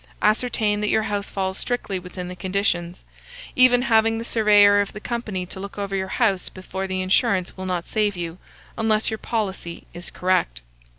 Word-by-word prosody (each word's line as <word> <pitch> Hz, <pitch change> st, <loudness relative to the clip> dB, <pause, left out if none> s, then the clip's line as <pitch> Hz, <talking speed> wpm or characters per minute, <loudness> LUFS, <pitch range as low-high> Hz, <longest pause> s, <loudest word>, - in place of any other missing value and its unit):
Ascertain 215 Hz, -1 st, +2 dB
that 210 Hz, -, 0 dB
your 220 Hz, -, +2 dB
house 205 Hz, -1 st, -2 dB
falls 190 Hz, -1 st, -2 dB
strictly 225 Hz, -6 st, -2 dB
within 180 Hz, 0 st, -7 dB
the 180 Hz, -, -7 dB
conditions. 180 Hz, -2 st, -1 dB, 0.5 s
Even 250 Hz, -1 st, +6 dB
having 225 Hz, -2 st, +3 dB
the 230 Hz, -, -4 dB
surveyor 205 Hz, -3 st, +5 dB
of 200 Hz, -, -4 dB
the 210 Hz, -, -7 dB
company 215 Hz, -5 st, -3 dB
to 185 Hz, -, -8 dB
look 200 Hz, +1 st, -8 dB
over 200 Hz, -1 st, -3 dB
your 190 Hz, 0 st, -1 dB
house 195 Hz, -2 st, +1 dB
before 190 Hz, +1 st, -5 dB
the 185 Hz, 0 st, -2 dB
insurance 190 Hz, -1 st, +2 dB
will 190 Hz, 0 st, -6 dB
not 180 Hz, -2 st, -2 dB
save 210 Hz, -3 st, 0 dB
you, 170 Hz, 0 st, -5 dB, 0.4 s
unless 220 Hz, -1 st, +1 dB
your 220 Hz, -, -3 dB
policy 195 Hz, -6 st, -3 dB
is 175 Hz, 0 st, -8 dB
correct." 60 Hz, -, 0 dB
200 Hz, 180 wpm, -23 LUFS, 185-220 Hz, 0.5 s, Even